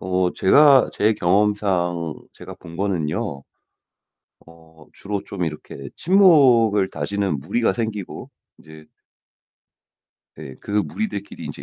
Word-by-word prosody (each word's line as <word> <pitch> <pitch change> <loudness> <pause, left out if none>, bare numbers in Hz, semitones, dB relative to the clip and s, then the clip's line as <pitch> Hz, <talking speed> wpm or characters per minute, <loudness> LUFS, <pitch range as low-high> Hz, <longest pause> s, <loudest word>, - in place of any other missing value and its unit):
어 90 -1 0
제가 140 +7 +5
제 110 +1 +1
경험상 90 -4 0 0.2
제가 - - -11
본 85 0 -13
거는요. 90 -4 -3 1.0
어 80 -1 -19
주로 100 0 -5
좀 90 -3 -5
이렇게 75 -3 -8
친목을 130 - +4
다지는 95 +2 -3
무리가 105 - 0
생기고 110 -5 -5 0.3
인제 80 0 -16 1.5
네 65 - -10
그 - - -11
무리들끼리 105 - -3
인제 - - -8
95 Hz, 220 characters per minute, -21 LUFS, 85-105 Hz, 1.5 s, 제가